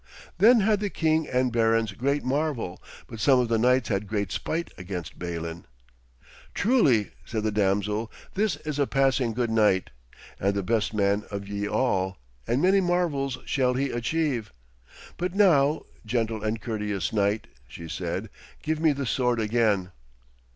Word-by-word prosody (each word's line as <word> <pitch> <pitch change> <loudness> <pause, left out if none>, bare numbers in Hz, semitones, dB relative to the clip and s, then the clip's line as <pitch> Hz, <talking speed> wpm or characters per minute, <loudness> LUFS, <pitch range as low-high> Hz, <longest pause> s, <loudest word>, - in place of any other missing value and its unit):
Then 230 +2 +7
had 210 0 +2
the 205 -1 -1
king 160 -3 +1
and 125 -1 0
barons 115 -2 +2
great 140 +8 -1
marvel, 130 - -2 0.2
but 115 - -10
some 130 +5 +5
of 120 -2 0
the 115 -1 +2
knights 125 +1 +3
had 100 -1 -1
great 100 -3 -2
spite 170 +1 -3
against 90 -5 -7
Balin. 85 -1 -5 0.9
'Truly,' 150 - +3
said 110 -2 -3
the 110 - 0
damsel, 105 +2 0 0.2
'this 205 -4 +1
is 150 -2 -3
a 140 - +2
passing 135 -3 +2
good 120 0 -1
knight, 105 -4 +2 0.5
and 100 +1 +1
the 100 - -1
best 110 +1 0
man 100 0 +2
of 100 -1 -5
ye 100 0 -3
all, 95 -6 0 0.3
and 125 +6 +1
many 195 +2 +5
marvels 165 -7 0
shall 125 -2 +1
he 135 +1 0
achieve. 120 -2 -1 0.7
But 180 +1 -3
now, 155 -8 +4 0.2
gentle 110 -1 -1
and 110 +1 -1
courteous 105 -6 -3
knight,' 105 0 +1 0.2
she 85 - -9
said, - - -4 0.3
'give 155 0 -1
me 160 -2 +3
the 140 -1 -3
sword 125 -1 +1
again.' 105 -4 +1
115 Hz, 160 wpm, -26 LUFS, 105-140 Hz, 0.9 s, Then